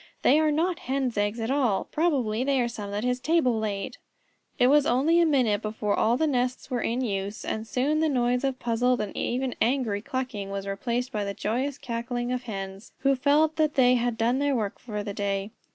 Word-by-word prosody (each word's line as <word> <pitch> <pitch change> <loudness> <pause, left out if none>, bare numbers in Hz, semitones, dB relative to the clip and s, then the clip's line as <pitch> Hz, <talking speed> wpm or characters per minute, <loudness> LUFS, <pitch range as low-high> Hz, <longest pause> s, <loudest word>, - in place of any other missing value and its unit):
"They 290 +4 +5
are 310 -1 +3
not 335 +4 0
Hens' 265 -3 0
eggs 205 +2 0
at 225 +3 -2
all. 255 -8 +1
Probably 260 -9 +1
they 275 0 +1
are 240 - +2
some 210 -4 -6
that 205 +2 -3
his 250 0 0
table 255 -6 +2
laid." 205 +1 -3 0.6
It 245 - +4
was 290 +2 +5
only 295 +8 +3
a 340 - +4
minute 240 -8 +2
before 215 -1 -2
all 230 +4 +2
the 315 - +2
nests 255 -2 -1
were 245 -2 0
in 240 +3 -1
use, 200 -3 -3
and 220 +1 -3
soon 280 +6 +1
the 315 0 +2
noise 245 -2 +1
of 270 -2 0
puzzled 245 +1 +1
and 210 - -4
even 255 0 -1
angry 235 -5 +1
clucking 250 -6 -4
was 195 0 -4
replaced 235 +6 -2
by 210 -3 -2
the 200 0 -4
joyous 255 +7 -2
cackling 240 0 -3
of 250 0 -3
Hens 195 -1 -7
who 275 0 +3
felt 295 +4 +2
that 310 -2 +1
they 250 -2 +5
had 240 -2 0
done 235 +3 +1
their 285 -1 +1
work 210 -4 -2
for 210 -4 -5
the 205 -1 -5
day. 200 0 -2
245 Hz, 215 wpm, -26 LUFS, 215-270 Hz, 0.6 s, They